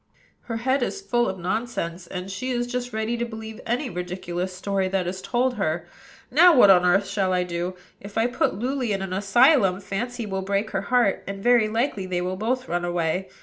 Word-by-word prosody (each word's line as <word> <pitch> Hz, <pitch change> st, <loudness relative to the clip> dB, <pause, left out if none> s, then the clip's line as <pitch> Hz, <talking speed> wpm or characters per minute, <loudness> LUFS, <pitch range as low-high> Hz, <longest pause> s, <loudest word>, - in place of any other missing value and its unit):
Her 230 Hz, -2 st, -3 dB
head 260 Hz, +4 st, +1 dB
is 320 Hz, -, -2 dB
full 240 Hz, -11 st, 0 dB
of 190 Hz, -, -4 dB
nonsense, 180 Hz, -3 st, -3 dB
and 185 Hz, +1 st, -6 dB
she 255 Hz, +7 st, -4 dB
is 240 Hz, -1 st, 0 dB
just 245 Hz, 0 st, -4 dB
ready 220 Hz, +2 st, -2 dB
to 235 Hz, -, -1 dB
believe 220 Hz, -1 st, -7 dB
any 245 Hz, +4 st, 0 dB
ridiculous 180 Hz, -1 st, -4 dB
story 190 Hz, +1 st, -1 dB
that 185 Hz, -1 st, -1 dB
is 185 Hz, +1 st, -4 dB
told 250 Hz, +3 st, 0 dB
her. 170 Hz, -3 st, -1 dB, 0.5 s
Now, 330 Hz, +3 st, +7 dB
what 205 Hz, -5 st, +8 dB
on 180 Hz, -2 st, +5 dB
earth 195 Hz, +3 st, +3 dB
shall 195 Hz, -2 st, 0 dB
I 180 Hz, 0 st, +2 dB
do? 175 Hz, +1 st, -3 dB, 0.2 s
If 200 Hz, +1 st, -9 dB
I 225 Hz, -, +3 dB
put 245 Hz, +1 st, 0 dB
Luly 250 Hz, -1 st, -1 dB
in 195 Hz, -1 st, -2 dB
an 190 Hz, -1 st, -4 dB
asylum, 200 Hz, 0 st, +4 dB
Fancy 235 Hz, +5 st, -4 dB
will 190 Hz, -2 st, -3 dB
break 200 Hz, +3 st, -1 dB
her 195 Hz, -, -1 dB
heart, 240 Hz, -6 st, +2 dB
and 195 Hz, 0 st, -6 dB
very 240 Hz, -3 st, +5 dB
likely 225 Hz, -4 st, -1 dB
they 180 Hz, -1 st, -1 dB
will 180 Hz, +1 st, -2 dB
both 250 Hz, +6 st, -2 dB
run 175 Hz, 0 st, -1 dB
away. 175 Hz, +1 st, -1 dB
200 Hz, 210 wpm, -24 LUFS, 185-240 Hz, 0.5 s, what